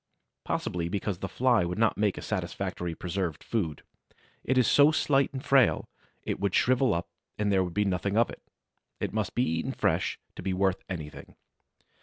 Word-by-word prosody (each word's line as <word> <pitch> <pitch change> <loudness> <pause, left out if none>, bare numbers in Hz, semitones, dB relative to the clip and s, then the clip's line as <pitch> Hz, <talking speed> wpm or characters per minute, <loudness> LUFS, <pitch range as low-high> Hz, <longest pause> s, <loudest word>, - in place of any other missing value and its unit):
Possibly 85 -1 -2
because 100 -1 -2
the 95 - -3
Fly 125 -5 +3
would 85 +2 -3
not 115 0 +3
make 105 -2 +1
a - - -6
satisfactory 85 -2 -3
preserved 90 -3 -3
food; 85 -10 -2 0.6
it 130 - +1
is 125 - +5
so 145 +6 +6
slight 140 -3 +2
and 135 -1 -6
frail, 135 -4 +4 0.4
it - - -3
would 100 -1 0
shrivel 130 +1 +3
up 85 +1 -3 0.3
and 105 -1 +1
there 95 -1 +3
would 90 -2 -6
be 105 - +2
nothing 100 +2 0
of 115 - +3
it; - - -11 0.6
it - - -3
must 105 -3 -2
be 125 - +3
eaten 80 -7 -1
fresh - - 0 0.2
to - - -7
be 95 0 -1
worth 95 0 +1
anything. 80 -5 -7
100 Hz, 185 wpm, -28 LUFS, 90-120 Hz, 0.6 s, so